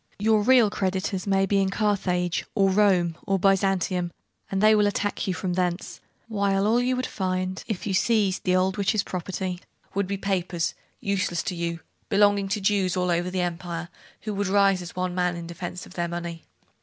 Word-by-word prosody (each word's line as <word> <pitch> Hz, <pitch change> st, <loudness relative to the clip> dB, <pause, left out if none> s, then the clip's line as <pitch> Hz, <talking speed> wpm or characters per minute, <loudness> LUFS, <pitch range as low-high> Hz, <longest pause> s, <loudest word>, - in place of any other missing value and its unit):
Your 215 Hz, +1 st, +3 dB
real 240 Hz, -2 st, +5 dB
creditors 190 Hz, 0 st, -2 dB
may 195 Hz, 0 st, +3 dB
be 200 Hz, 0 st, +2 dB
in 190 Hz, -, +1 dB
Carthage, 185 Hz, -4 st, 0 dB
or 195 Hz, -2 st, +3 dB
Rome, 185 Hz, -4 st, +3 dB
or 195 Hz, -1 st, +2 dB
Byzantium, 190 Hz, -2 st, +1 dB, 0.4 s
and 195 Hz, -, -1 dB
they 215 Hz, +2 st, +6 dB
will 210 Hz, -1 st, +4 dB
attack 205 Hz, 0 st, -1 dB
you 185 Hz, -, 0 dB
from 180 Hz, -1 st, -2 dB
thence; 180 Hz, 0 st, -2 dB, 0.3 s
while 200 Hz, -2 st, +1 dB
all 220 Hz, +3 st, +3 dB
that 245 Hz, -, +1 dB
you 255 Hz, 0 st, +1 dB
would 255 Hz, 0 st, -1 dB
find 185 Hz, -1 st, -2 dB
if 215 Hz, -5 st, -3 dB
you 200 Hz, -, -1 dB
seized 200 Hz, -2 st, +2 dB
the 185 Hz, -1 st, +2 dB
old 185 Hz, +2 st, +1 dB
witch's 200 Hz, +1 st, +1 dB
property, 185 Hz, 0 st, -4 dB, 0.3 s
would 200 Hz, -1 st, 0 dB
be 200 Hz, +1 st, -2 dB
papers, 185 Hz, -3 st, -1 dB, 0.3 s
useless 185 Hz, -4 st, -1 dB
to 180 Hz, -, -3 dB
you, 170 Hz, -1 st, -3 dB, 0.3 s
belonging 205 Hz, -1 st, +3 dB
to 195 Hz, +2 st, -1 dB
Jews 195 Hz, -2 st, +1 dB
all 180 Hz, -1 st, +1 dB
over 175 Hz, +1 st, 0 dB
the 185 Hz, 0 st, -1 dB
empire, 170 Hz, -1 st, -4 dB, 0.3 s
who 215 Hz, -, -4 dB
would 200 Hz, 0 st, -1 dB
rise 195 Hz, -1 st, +3 dB
as 175 Hz, 0 st, -9 dB
one 185 Hz, 0 st, -1 dB
man 180 Hz, -1 st, 0 dB
in 170 Hz, 0 st, -6 dB
defence 175 Hz, +1 st, -6 dB
of -, -, -14 dB
their 175 Hz, -1 st, -1 dB
money. 170 Hz, -1 st, -6 dB
190 Hz, 195 wpm, -25 LUFS, 180-200 Hz, 0.4 s, they